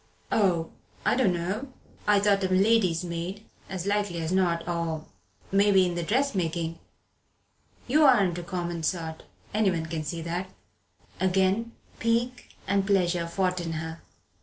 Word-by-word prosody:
"Oh 175 -6 +2 0.3
I - - +3
dunno 200 +3 0 0.4
I 205 -1 +5
thought 200 -1 +3
a - - +2
lady's 185 -2 +3
maid, 175 +5 -5 0.2
as 190 -2 -4
likely 205 -3 0
as 160 +1 -2
not, 175 -3 +1
or 165 -2 -2 0.5
maybe 195 -1 +5
in 175 - -1
the 175 - -2
dressmaking. 170 - 0 1.1
You 300 +5 +4
aren't 200 -10 +4
a - - -6
common 175 -2 -3
sort 160 -1 -2 0.3
anyone 190 -6 +1
can 160 -1 -3
see 165 +2 -4
that." 175 +3 -3 0.7
Again 190 +5 +1 0.3
pique 235 +2 0 0.2
and 195 0 +1
pleasure 180 -4 +2
fought 180 +1 0
in 165 -1 -3
her. 160 +1 -5
185 Hz, 135 wpm, -27 LUFS, 170-200 Hz, 1.1 s, I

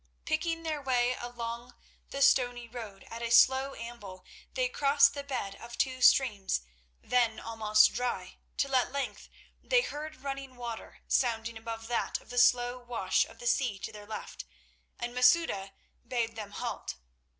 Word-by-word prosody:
Picking 330 +1 -1
their 310 -3 -2
way 250 -2 +2
along 240 0 -6 0.3
the 275 0 0
stony 245 -2 +3
road 225 -5 -8
at 230 - -6
a 235 - -2
slow 265 +3 +5
amble, 220 -6 -9 0.3
they - - +2
crossed 290 - +4
the 285 - -4
bed 255 -8 -3
of 235 0 -10
two 255 -1 0
streams 210 - +4 0.4
then 235 -2 +2
almost 215 -1 +3
dry, 210 -7 -3 0.2
till 275 -1 0
at 250 - +2
length 280 0 -4 0.3
they - - +4
heard 310 - -6
running 275 -1 -5
water 235 -2 -7
sounding 230 -2 +1
above 225 0 -6
that 240 0 -1
of - - -16
the 245 - +1
slow 245 0 +4
wash 240 -6 0
of - - -15
the 240 - -10
sea 240 -3 +1
to - - -6
their 210 -1 -11
left, 215 -1 -7 0.5
and 240 0 -4
Masouda 250 - +3 0.3
bade 230 -2 -2
them 210 -2 -6
halt. - - -4
245 Hz, 160 wpm, -30 LUFS, 225-270 Hz, 0.5 s, slow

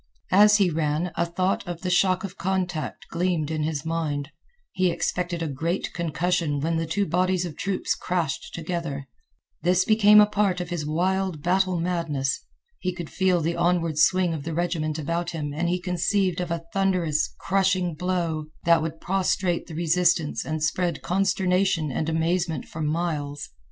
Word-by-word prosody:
As 210 +2 +7
he 195 -4 +3
ran 155 +2 0
a 170 - 0
thought 185 +3 -1
of 175 -1 -5
the 185 -1 -2
shock 185 0 +3
of 195 -1 -6
contact 180 -3 -2
gleamed 170 -3 0
in 155 -1 -1
his 150 -1 -2
mind. 155 -3 -2 0.4
He 185 -1 +2
expected 175 0 -2
a - - -1
great 160 +6 -2
concussion 170 -2 0
when 165 +3 0
the 165 0 -2
two 200 +5 0
bodies 180 +2 +1
of 165 -4 -6
troops 195 -1 -1
crashed 170 -6 -2
together. 165 -5 -4 0.5
This 180 +1 +3
became 210 -1 +6
a 210 - +8
part 205 -3 0
of 175 0 -5
his 155 -4 -2
wild 180 0 0
battle 185 0 +2
madness. 155 -6 -1 0.4
He 185 -1 -2
could 170 -3 -7
feel 185 -2 +2
the 165 +2 -1
onward 170 -3 +1
swing 180 +1 +4
of 155 - -4
the 160 0 -4
regiment 165 -3 -1
about 170 +3 -2
him 150 -4 -4
and 170 +3 -1
he 180 +1 0
conceived 180 +1 0
of 175 - -3
a 165 0 -3
thunderous, 180 -6 +1
crushing 185 -2 +1
blow 165 -2 -2 0.2
that 170 -1 +5
would 160 0 -4
prostrate 185 -1 0
the 165 - -8
resistance 170 -1 +2
and 155 -1 -3
spread 170 0 0
consternation 185 -3 +1
and 155 +5 -1
amazement 165 +1 0
for 160 - -7
miles. 150 -2 -2
170 Hz, 170 wpm, -25 LUFS, 160-185 Hz, 0.5 s, a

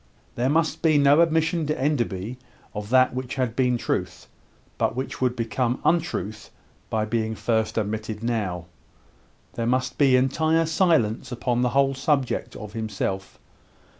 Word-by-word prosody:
There 125 +2 0
must 160 +1 +1
be 155 -2 +4
no 145 +2 +5
admission 160 -1 +1
to 150 - -1
Enderby 120 -5 -1 0.3
of 105 0 -6
that 130 +1 +4
which 130 0 -4
had 125 -4 -1
been 125 -2 +2
truth, - - -3 0.5
but - - +1
which 130 +1 -4
would 125 -1 +1
become 120 +1 -1
untruth 110 - -1 0.4
by 110 -1 0
being 110 0 -1
first 110 0 -1
admitted 110 0 -3
now. 100 -8 -2 0.9
There 115 -1 -2
must 130 +2 0
be 135 -3 +5
entire 160 +6 +2
silence 155 - +1
upon 120 0 -1
the 125 - +2
whole 135 0 +4
subject 135 -1 -1
of 105 -1 -8
himself. 100 -3 -3
125 Hz, 145 wpm, -24 LUFS, 110-140 Hz, 0.9 s, no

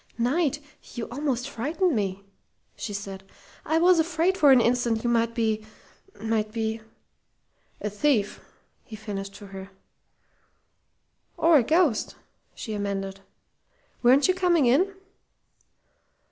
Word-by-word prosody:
"Knight, 285 +5 +1 0.4
you 240 - -4
almost 260 -2 -2
frightened 300 - -1
me!" 200 -2 -2 0.5
she - - -6
said. 195 -1 -6 0.4
"I 315 - +1
was 350 +1 +5
afraid 335 +3 +1
for 300 -6 +5
an 260 - +7
instant 235 -1 +1
you 240 - +1
might 230 0 +1
be 220 -2 0 0.6
might 220 -1 -1
be 220 0 -2 0.5
" - - -48 0.3
"A 210 - -2
thief!" 210 -2 0 0.4
he 220 - -10
finished 200 -2 -6
for 205 - -11
her. 195 0 -9 1.7
"Or 330 -1 +5
a - - +1
ghost," 310 -3 +1 0.4
she 220 - -6
amended. 195 -1 -3 0.8
"Weren't 260 +3 +5
you 370 - +3
coming 355 -5 +2
in?" 300 +11 +3
235 Hz, 125 wpm, -26 LUFS, 210-300 Hz, 1.7 s, an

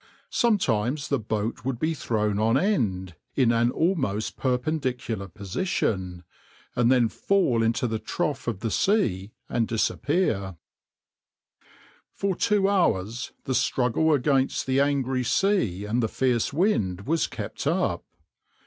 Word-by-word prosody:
Sometimes 140 - +1
the 140 - +1
boat 110 +1 -3
would 130 -1 -2
be 155 +6 0
thrown 105 -7 -1
on 115 +3 +3
end, 105 - 0 0.2
in 125 -4 +3
an 120 +1 +3
almost 130 - 0
perpendicular 125 -5 -2
position, 95 - -2 0.5
and 120 0 +3
then 125 -3 +4
fall 130 - +1
into 115 +2 +1
the 110 -2 -1
trough 145 +5 -3
of 110 -5 -2
the 115 - -2
sea 110 - +1 0.2
and 115 -2 0
disappear.\par 110 - 0 1.5
For 195 -2 -1
two 205 -1 +2
hours 125 - 0
the 130 - -2
struggle 130 +5 +2
against 135 -1 +1
the 130 0 +1
angry 135 -2 +1
sea 120 - +1
and 115 +4 0
the 110 - +1
fierce 125 -2 0
wind 140 - +1
was 160 +9 0
kept - - -5
up. - - 0
125 Hz, 130 wpm, -26 LUFS, 110-150 Hz, 1.5 s, then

